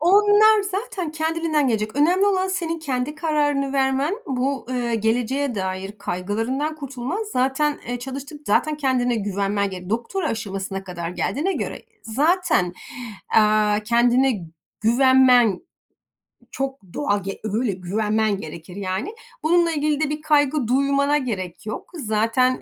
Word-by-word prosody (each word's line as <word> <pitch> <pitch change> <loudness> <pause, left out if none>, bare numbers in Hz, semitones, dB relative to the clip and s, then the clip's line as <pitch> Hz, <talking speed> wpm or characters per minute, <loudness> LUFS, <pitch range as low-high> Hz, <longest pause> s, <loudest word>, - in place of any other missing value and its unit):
Onlar 415 +4 +5
zaten 395 -3 -3
kendiliğinden 315 -2 0
gelecek. 215 +1 -1
Önemli 360 +7 +4
olan 380 -1 +2
senin 335 -3 -2
kendi 275 -1 -2
kararını 290 -3 0
vermen. 270 +6 +1
Bu, 265 0 -1
eee, 245 -2 -1
geleceğe 240 +4 0
dair 190 0 -3
kaygılarından 225 - -2
kurtulman. 275 - -4
Zaten, 270 +4 +1
eee, 245 - -2
çalıştın. 275 +4 -7
Zaten 305 +9 +2
kendine 255 -4 +1
güvenmen 200 -1 -1
gerek. 180 0 -8
Doktora 270 - -1
aşamasına 195 -3 -4
kadar 175 -2 -5
geldiğine 300 - -1
göre - - -4 0.2
zaten, 295 - +1 0.6
eee, 215 -1 +4
kendine 240 -2 +3 0.4
güvenmen 250 -1 +5 0.9
çok 270 0 -3
doğal 205 -9 0
ge 195 +1 -5
öyle 220 +2 0
güvenmen 210 +3 0
gerekir, 170 0 -9
yani. 200 - -3 0.3
Bununla 340 +1 +3
ilgili 300 -1 0
de 310 - +1
bir 300 +1 -3
kaygı 290 -3 +2
duymana 280 +3 +2
gerek 200 - -4
yok. 215 - -6
Zaten, 230 0 +1
260 Hz, 125 wpm, -22 LUFS, 215-300 Hz, 0.9 s, Onlar